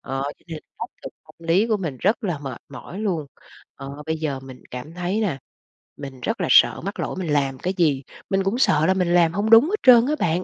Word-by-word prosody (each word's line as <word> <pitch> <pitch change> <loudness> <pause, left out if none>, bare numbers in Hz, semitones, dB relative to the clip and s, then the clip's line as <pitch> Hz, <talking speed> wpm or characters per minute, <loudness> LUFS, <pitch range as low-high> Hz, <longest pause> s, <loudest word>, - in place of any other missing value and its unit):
ờ, 135 0 -4 0.2
cho - - -30
nên 160 -2 -6 0.2
áp - - -5 0.2
lực - - -7
tâm - - -18
lý 195 +7 +3
của 220 -2 +1
mình 160 -9 -5
rất 215 +4 +1
là 175 -6 -2
mệt 135 -4 -7
mỏi 140 +8 -9
luôn. 175 -9 -2 0.5
Ờ, 140 +2 -9
bây 160 0 -1
giờ 140 -4 -3
mình 130 -1 -12
cảm 125 +6 -8
thấy 180 +4 -2
là 175 -11 -1 0.6
mình 135 -3 -9
rất - - -2
là - - 0
sợ - - +5
mắc - - -5
lỗi - - -3
mình 165 -5 -2
làm 135 -2 0
cái 185 +2 -2
gì, 145 -6 +2 0.3
mình 195 0 +1
cũng 200 +5 -1
sợ 155 - +3
là 190 - +3
mình 180 -2 0
làm 170 -2 +4
hông 205 +3 -1
đúng 225 +5 +8
hết 420 - +1
trơn 245 -2 +7
á 300 +2 0
bạn. 175 +2 0
170 Hz, 245 wpm, -22 LUFS, 140-195 Hz, 0.6 s, đúng